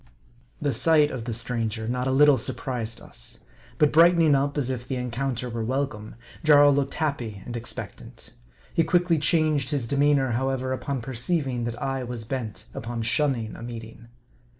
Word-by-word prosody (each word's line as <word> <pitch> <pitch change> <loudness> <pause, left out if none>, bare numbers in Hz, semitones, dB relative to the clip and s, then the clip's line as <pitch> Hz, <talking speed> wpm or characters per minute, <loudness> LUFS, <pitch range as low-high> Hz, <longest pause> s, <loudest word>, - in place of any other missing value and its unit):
The 145 - 0
sight 150 +4 +4
of 120 -4 -5
the 120 - -3
stranger 115 -1 -1
not 125 +2 -1
a - - +1
little 140 0 +5
surprised 115 -1 -3
us. - - -9 0.4
But 150 +2 +4
brightening 165 -1 +6
up, 140 +1 +1
as 130 -3 0
if 125 -1 -5
the 130 - -2
encounter 125 0 -3
were 115 -1 -3
welcome, 120 -3 -3 0.3
Jarl 145 -2 +7
looked 140 0 -1
happy 120 -10 -3
and 120 - -6
expectant. 120 0 -7 0.4
He 165 - +3
quickly 175 0 +2
changed 155 -3 +2
his 140 -6 -1
de 140 - -1
meanor, 140 -3 +3
however, 130 +1 -1
upon 135 0 -3
perceiving 130 0 -1
that 120 0 -4
I 135 -1 -2
was 120 -2 -4
bent 110 -5 -5
upon 115 0 -4
shunning 120 -2 0
a - - -10
meeting. 115 0 -9
130 Hz, 170 wpm, -25 LUFS, 115-145 Hz, 0.4 s, Jarl